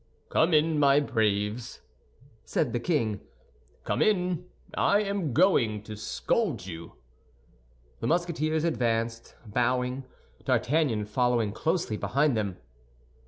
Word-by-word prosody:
"Come 165 +3 +3
in, 155 0 +3
my 140 0 +5
braves," 110 -3 -1 0.6
said 135 -7 -1
the 120 - 0
king, 115 - 0 0.6
"come - - -1
in; 180 -4 +1 0.3
I 205 +1 +3
am 200 -7 -2
going 120 - +3
to 110 0 -8
scold 130 - -1
you." 85 -2 -8 1.1
The - - -2
Musketeers 160 -2 0
advanced, 115 -7 -1
bowing, 125 +4 0 0.4
D'Artagnan 125 -2 +1
following 120 0 +1
closely 160 - -1
behind 135 +8 +1
them. 100 -4 -2
125 Hz, 110 wpm, -28 LUFS, 110-160 Hz, 1.1 s, my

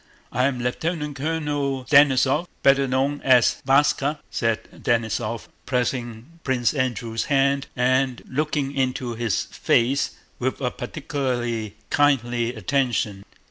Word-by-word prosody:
I'm 130 +1 +1
Lieutenant 150 +4 -2
Colonel 145 -3 -2
Denísov, 140 +3 +4 0.2
better 135 0 +5
known 135 +3 0
as 125 -3 +4
'Váska,'" 140 +2 +3
said 115 -2 0 0.2
Denísov, 115 -1 -1 0.2
pressing 125 +3 -3
Prince 125 -3 +1
Andrew's 120 -4 -2
hand 140 0 +2
and 130 0 +1
looking 145 0 -1
into 130 -2 -1
his 115 -4 -1
face 125 +4 +1 0.2
with - - -1
a - - -1
particularly 120 -6 -3 0.2
kindly 120 -4 +2
attention. 110 -4 -1
130 Hz, 105 wpm, -23 LUFS, 120-140 Hz, 0.2 s, better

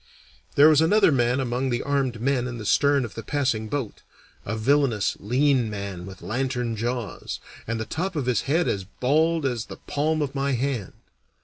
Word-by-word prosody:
There 145 +2 +8
was 155 -1 +6
another 200 +2 +5
man 125 -1 +2
among 130 +1 -1
the 120 -1 -1
armed 135 -4 0
men 125 0 0
in 120 -1 -5
the 110 - -7
stern 140 +3 +3
of 115 - -9
the 115 - -6
passing 115 -3 -1
boat 120 -2 -4 0.4
a 110 +2 -3
villainous, 120 -3 +2
lean 125 +2 +2
man 100 -3 -5
with 95 -1 -11
lantern 125 -1 -2
jaws, 120 0 -4 0.3
and 115 0 -2
the 110 - -3
top 180 - -3
of 145 -5 -1
his 125 -2 +1
head 165 +4 +2
as 95 - -1
bald 155 - +1
as 120 -4 -1
the - - -9
palm 150 +2 -1
of 140 -1 -4
my 140 0 0
hand. 125 -5 -2
130 Hz, 190 wpm, -25 LUFS, 115-145 Hz, 0.4 s, There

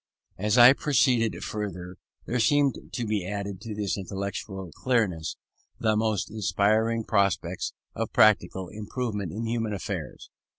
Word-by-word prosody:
As 105 +4 +1
I 120 +2 +10
proceeded 125 -5 +2
further, 95 -4 -5 0.3
there 125 - -1
seemed 140 +3 +3 0.2
to 120 - -2
be 105 -3 -1
added 100 0 -4
to 110 -1 -6
this 100 -1 -2
intellectual 95 -1 -5
clearness, 95 - 0 0.4
the 110 -1 +2
most 110 -2 0
inspiring 110 +3 +1
prospects 100 -4 0 0.2
of - - -3
practical 95 -3 +3
improvement 105 -3 -4
in 115 +3 -4
human 115 -2 -1
affairs. 100 - -6
105 Hz, 130 wpm, -27 LUFS, 100-115 Hz, 0.4 s, I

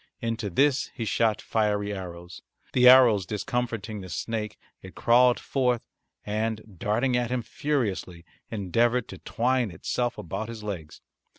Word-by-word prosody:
Into 115 -2 -2
this 140 - +2
he 115 - -3
shot 110 0 +1
fiery 105 -2 0
arrows. 85 -2 -8 0.3
The 125 -1 +7
arrows 120 -6 +7
discomforting 110 +1 -3
the 95 - -9
snake 110 +2 -4 0.2
it 95 - -12
crawled 125 +1 +4
forth 125 -3 0 0.4
and, 110 0 -3
darting 120 +5 +1
at 120 -1 0
him 125 -1 -1
furiously, 110 - -2 0.2
endeavoured 115 +4 +1
to - - -9
twine 125 0 0
itself 120 +8 -2
about 110 +6 -5
his 115 -2 -8
legs. 90 -7 -6
110 Hz, 135 wpm, -26 LUFS, 100-125 Hz, 0.4 s, The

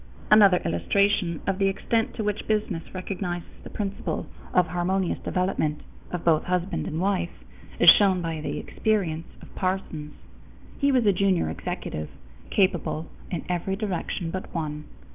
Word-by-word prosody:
Another 200 -4 +8
illustration 175 - +1
of 195 0 0
the 195 - +3
extent 225 +3 0
to 220 - -2
which 210 0 -2
business 210 -6 0
recognizes 185 -2 -4 0.2
the - - -9
principle 200 -2 -3 0.3
of 180 - +4
harmonious 180 +2 0
development 180 -5 -1 0.3
of 180 -1 -5
both 160 -2 +4
husband 180 +1 -1
and 160 - -3
wife 185 -2 +1 0.5
is 175 - +4
shown 190 +1 +8
by 165 -2 -3
the - - -3
experience 175 -7 -1 0.2
of - - -14
Parsons. 185 -5 -3 0.6
He 280 -1 +3
was 255 -4 +3
a 200 - +5
junior 185 - +2
executive, 75 -1 -4 0.4
capable 175 -4 +1 0.2
in 175 - -4
every 180 +1 -1
direction 185 -4 -3
but 185 +1 -5
one. 150 -2 -3
185 Hz, 145 wpm, -26 LUFS, 165-200 Hz, 0.6 s, Another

